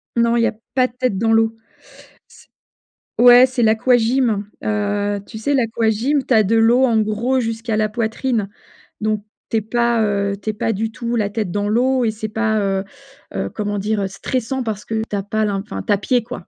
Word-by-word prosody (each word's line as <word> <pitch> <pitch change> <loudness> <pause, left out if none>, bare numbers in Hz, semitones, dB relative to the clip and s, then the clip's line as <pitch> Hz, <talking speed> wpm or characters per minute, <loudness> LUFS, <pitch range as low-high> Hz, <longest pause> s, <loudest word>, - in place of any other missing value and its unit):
Non, 235 0 +2
il 235 - +2
y - - +4
a - - -2 0.2
pas 255 -1 +4
de 240 - -22
tête 250 -6 -1
dans 225 +2 +2
l'eau. 225 0 +2 0.7
C - - -19 0.7
ouais, 245 +1 +8
c'est 255 -2 -1
l'aquagym, 225 -1 +2 0.2
heu, 205 -1 -1
tu 220 - -9
sais, 285 +6 0
l'aquagym, 230 +3 +1
tu - - +1
as 220 -2 +5
de 225 +4 +1
l'eau, 235 +4 +4
en 230 -3 +2
gros, 220 +5 0
jusqu'à 225 -1 -2
la 215 -1 +1
poitrine. 225 -1 -1 0.5
Donc, 215 -1 -1 0.2
tu 225 - 0
es - - +1
pas, 235 +1 +1
heu, 200 -1 0
tu 215 - -2
es - - -12
pas 220 - -1
du 220 +2 -2
tout 235 0 -3
la 205 -3 0
tête 210 -4 -3
dans 205 +1 -1
l'eau 250 +3 +2
et 220 - +1
c'est 215 0 -6
pas, 220 0 0
heu-heu, 210 +9 -5
comment 205 -1 -3
dire? 205 -1 -1
Stressant 255 +5 -3
parce 215 -3 -4
que 220 -1 -2
tu 205 - -3
as 195 - -2
pas 215 +2 -1
l'in 200 -2 -1
enfin, 215 - -6
tu 210 - +1
as - - +2
pied, 245 +3 +1
quoi. 230 -6 -9
225 Hz, 210 wpm, -19 LUFS, 210-240 Hz, 0.7 s, ouais